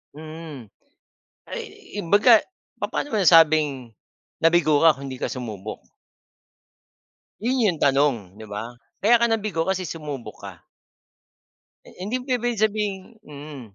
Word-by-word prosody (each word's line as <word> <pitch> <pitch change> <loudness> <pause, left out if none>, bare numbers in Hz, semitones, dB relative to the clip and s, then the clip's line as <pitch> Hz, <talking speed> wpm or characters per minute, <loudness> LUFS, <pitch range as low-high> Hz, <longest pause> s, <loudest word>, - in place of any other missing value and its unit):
Mm. 155 -5 -9 0.8
Ay, - - -5 0.4
yung 170 -4 -6
baga, 215 +3 +6 0.3
papaano 290 - -3
mo - - +2
nasabing 155 -7 +4 0.5
nabigo 165 -3 +4
ka 160 -3 +6
kung 140 +1 -8
'di 130 -1 -7
ka - - -2
sumubok? 110 -5 -6 1.6
Yun 245 +1 +1
yung 175 -6 0
tanong, 135 -9 +1
'di 110 - -10
ba? 110 +4 -7 0.2
Kaya 235 +4 +5
ka 235 - +2
nabigo 215 -7 -1
kasi 190 0 -1
sumubok 150 -7 -7
ka. - - -10 1.2
Eh, - - -15
hindi 210 +8 -3
pwedeng 245 -2 -1
sabihing 210 0 -1
mm. 145 -1 -9
160 Hz, 125 wpm, -23 LUFS, 135-210 Hz, 1.6 s, baga